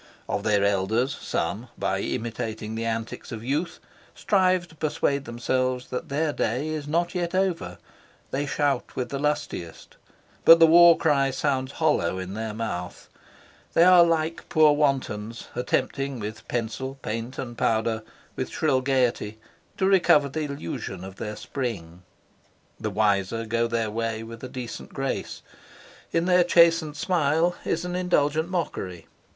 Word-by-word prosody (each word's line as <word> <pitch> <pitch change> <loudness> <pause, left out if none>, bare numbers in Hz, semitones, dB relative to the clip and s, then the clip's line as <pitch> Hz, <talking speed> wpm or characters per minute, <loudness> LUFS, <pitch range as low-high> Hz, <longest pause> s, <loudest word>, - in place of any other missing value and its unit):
Of - - -1
their 105 -2 +2
elders 110 +8 +1
some, 105 +9 -3
by 95 0 -1
imitating 110 0 -4
the 115 +1 -3
antics 115 +2 -4
of 115 -2 -6
youth, 145 +7 -2 0.4
strive 185 -3 +2
to 160 - -17
persuade 145 -2 -1
themselves 130 +1 -1
that 125 - -4
their 150 +2 0
day 130 +8 -1
is 155 -2 -4
not 170 +3 0
yet 175 -1 -2
over; 185 -3 -1 0.5
they 140 +2 -1
shout 145 0 -1
with 125 - -3
the 140 - -3
lustiest, 140 - -3 0.5
but 165 0 +9
the 165 - +9
war 170 +1 +8
cry 140 -3 +2
sounds 135 0 -1
hollow 150 - +1
in 95 +1 -5
their 110 0 -4
mouth; 90 -6 -5 0.7
they 165 - +6
are 180 -1 +8
like 165 -1 -1
poor 155 -2 +5
wantons 125 -7 -1
attempting 130 +2 -1
with 110 +1 -7
pencil, 125 +3 -3
paint 115 +4 -4
and 120 -2 -5
powder, 110 -1 0 0.3
with - - -3
shrill 130 - +1
gaiety, 125 -5 0 0.4
to 190 - +1
recover 180 -7 +5
the 155 +3 -3
illusion 140 - -5
of 95 0 -9
their 105 -1 -5
spring. 100 -8 -5 0.8
The - - -2
wiser 105 +1 +1
go 115 +1 0
their 115 -2 -1
way 115 0 -2
with 115 +1 -10
a 130 - -5
decent 125 -2 -7
grace. 135 0 -3 0.7
In 165 0 +1
their 180 -1 +5
chastened 165 -3 +4
smile 170 0 +1
is 165 +2 -1
an 180 0 -3
indulgent 160 -3 +1
mockery. 95 - -3
130 Hz, 150 wpm, -25 LUFS, 110-155 Hz, 0.8 s, but